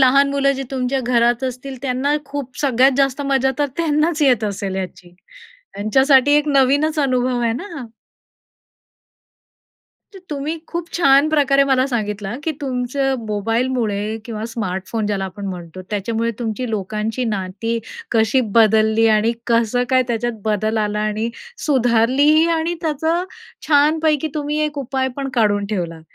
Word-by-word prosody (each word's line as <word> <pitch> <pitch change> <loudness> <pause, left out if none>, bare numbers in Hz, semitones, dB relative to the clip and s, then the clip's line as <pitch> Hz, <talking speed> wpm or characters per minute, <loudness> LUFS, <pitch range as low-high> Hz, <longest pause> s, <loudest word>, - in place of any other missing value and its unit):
लहान 275 +2 +5
मुलं 275 0 +2
जी 270 0 -4
तुमच्या 265 0 -1
घरात 240 0 +2
असतील 260 +1 -5
त्यांना 270 +2 0
खूप 275 -2 -6
सगळ्यात 265 -1 +3
जास्त 275 0 +1
मजा 270 -1 +2
तर 290 - +2
त्यांनाच 310 0 +1
येत 245 -6 +3
असेल 200 -1 -3
याची. 180 -2 -7 0.6
त्यांच्यासाठी 265 +7 +3
एक 295 0 +1
नवीनच 285 +3 +2
अनुभव 255 -3 +1
आहे 230 -1 +1
ना 255 +11 -5
हा. 255 -5 -6 2.3
तर 385 - -11
तुम्ही 295 +3 -3
खूप 340 0 -4
छान 280 -3 +4
प्रकारे 275 -2 +3
मला 265 -1 +2
सांगितलं, 210 -3 -3
की 320 - -1
तुमचं 265 0 -1
मोबाईलमुळे 220 0 -1
किंवा 220 -2 -5
स्मार्टफोन 210 0 -3
ज्याला 200 -2 -1
आपण 195 +2 -7
म्हणतो 180 -1 -7
त्याच्यामुळे 225 +3 -1
तुमची 240 +1 -3
लोकांशी 215 +4 -2
नाती 210 +2 -2 0.3
कशी 225 +3 +3 0.2
बदलली 220 0 +4
आणि 225 +2 +1
कसं 235 +1 +2
काय 260 0 +4
त्याच्यात 235 -1 -2
बदल 215 +1 0
आला 210 0 -1
आणि 215 +2 -1 0.4
सुधारलीही 265 +4 +3
आणि 330 +2 -1
त्याचं 320 +3 0 0.4
छानपैकी 305 +1 +3
तुम्ही 300 0 -2
एक 300 -1 -4
उपाय 265 0 -1
पण 275 -1 -3
काढून 205 -3 +2
ठेवला, 170 -5 -3
250 Hz, 140 wpm, -19 LUFS, 215-280 Hz, 2.3 s, लहान